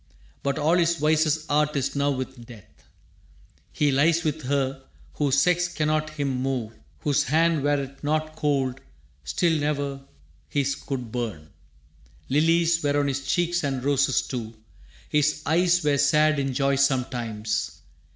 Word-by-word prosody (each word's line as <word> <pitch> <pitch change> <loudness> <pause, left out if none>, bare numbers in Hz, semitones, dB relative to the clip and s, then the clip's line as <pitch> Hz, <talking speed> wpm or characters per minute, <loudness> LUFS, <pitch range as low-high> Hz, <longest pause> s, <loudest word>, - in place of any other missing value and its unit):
But 140 0 -1
all 160 +4 +2
his 170 0 +2
vices' 155 0 +1
art 150 0 +1
is 135 0 -1
now 140 0 +1
with 130 -3 -5
Death: 110 -6 -16 0.8
He 145 -1 +1
lies 160 +5 +3
with 155 -1 -2
her, 135 0 -1 0.3
whose 140 -2 +1
sex 175 +3 +2
cannot 155 -2 -1
him 140 -4 -2
move, 130 -4 -2 0.3
Whose 145 -1 +1
hand, 160 +2 +2
were't 140 -1 -2
not 155 +1 -1
cold, 135 -4 -1 0.4
still 165 - +1
ne'er 145 -2 -2 0.5
his 140 -1 0
could 125 -5 -6
burn. 110 -11 -5 0.8
Lilies 165 +3 +3
were 145 0 +1
on 140 -1 +1
his 135 0 -4
cheeks 175 -1 +1
and 135 -3 -2
roses 140 -1 +2
too. 115 -3 -6 0.5
His 150 0 +1
eyes 175 +1 +3
were 145 -2 +2
sad 150 +1 +3
in 135 -1 -1
joy 140 0 +1
sometimes. 120 -6 -1
145 Hz, 140 wpm, -25 LUFS, 135-155 Hz, 0.8 s, lies